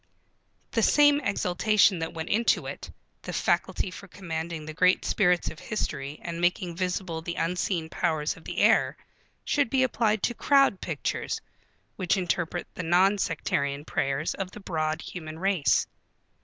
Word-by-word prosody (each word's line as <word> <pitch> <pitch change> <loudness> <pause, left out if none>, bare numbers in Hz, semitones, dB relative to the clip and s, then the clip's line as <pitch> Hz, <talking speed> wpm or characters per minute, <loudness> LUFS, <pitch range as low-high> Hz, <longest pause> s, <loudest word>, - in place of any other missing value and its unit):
The - - +1
same 290 -1 +5
exultation 200 - +2
that 165 +1 -4
went 160 0 -5
into 230 +3 +2
it, - - -7 0.3
the - - -6
faculty 185 - 0
for 200 +2 -10
commanding 165 -3 -5
the 155 - -6
great 180 +4 +3
spirits 180 -4 +2
of 155 - -11
history 145 -8 -4
and 170 0 -4
making 175 0 0
visible 180 -2 -2
the 170 +1 -5
unseen 175 -1 -1
powers 155 -2 -1
of 165 - -15
the - - -6
air, - - +4 0.5
should 285 -4 +1
be 260 +1 +3
applied 220 -4 +1
to 240 - +1
Crowd 275 -5 +3
Pictures - - -3 0.6
which 185 -1 +1
interpret 175 -1 -1
the - - -5
non 185 +4 +3
sectarian 140 -4 -1
prayers 140 +2 -1
of 195 -2 -4
the 210 - -11
broad 160 -4 -2
human 155 -3 -7
race. 185 -4 +2
175 Hz, 155 wpm, -27 LUFS, 160-200 Hz, 0.6 s, same